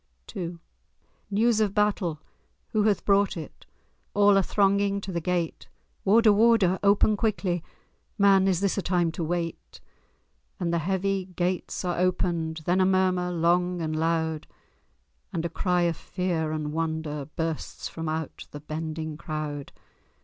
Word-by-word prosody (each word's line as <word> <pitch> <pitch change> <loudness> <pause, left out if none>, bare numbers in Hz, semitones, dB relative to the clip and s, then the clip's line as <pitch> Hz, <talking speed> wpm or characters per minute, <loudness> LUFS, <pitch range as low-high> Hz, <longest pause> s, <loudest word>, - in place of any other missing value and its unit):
II 175 -1 -4 0.7
News 220 +2 +2
of 205 -2 0
battle! 200 -7 +1 0.5
Who 215 - +1
hath 210 -3 +1
brought 200 -2 +3
it? 155 -3 -9 0.5
All 205 0 +6
are 195 - +5
thronging 200 +1 +2
to 195 -1 -6
the 170 -1 -2
gate; 175 -1 -2 0.4
"Warder—warder! 210 -2 +5
open 205 +1 +4
quickly! 195 -5 -1 0.5
Man—is 195 -3 +4
this 200 0 +1
a - - 0
time 175 -3 +1
to 165 +1 -4
wait?" 165 +1 -4 0.8
And 170 -2 -1
the 170 - +2
heavy 190 +2 -1
gates 180 0 -2
are 175 -1 -1
opened; 170 -3 0
Then 180 +2 +2
a - - +4
murmur 185 -1 +2
long 175 +1 +1
and 155 -1 -2
loud, 160 -1 -1 0.8
And 170 -3 -2
a - - -1
cry 180 0 +1
of 170 -2 0
fear 175 -4 -2
and 150 -1 -3
wonder 160 -3 -3
Bursts 160 -1 -3
from 165 -1 -5
out 160 -1 -4
the 145 - -8
bending 155 0 -5
crowd. 155 -3 -5
180 Hz, 140 wpm, -26 LUFS, 160-195 Hz, 0.8 s, All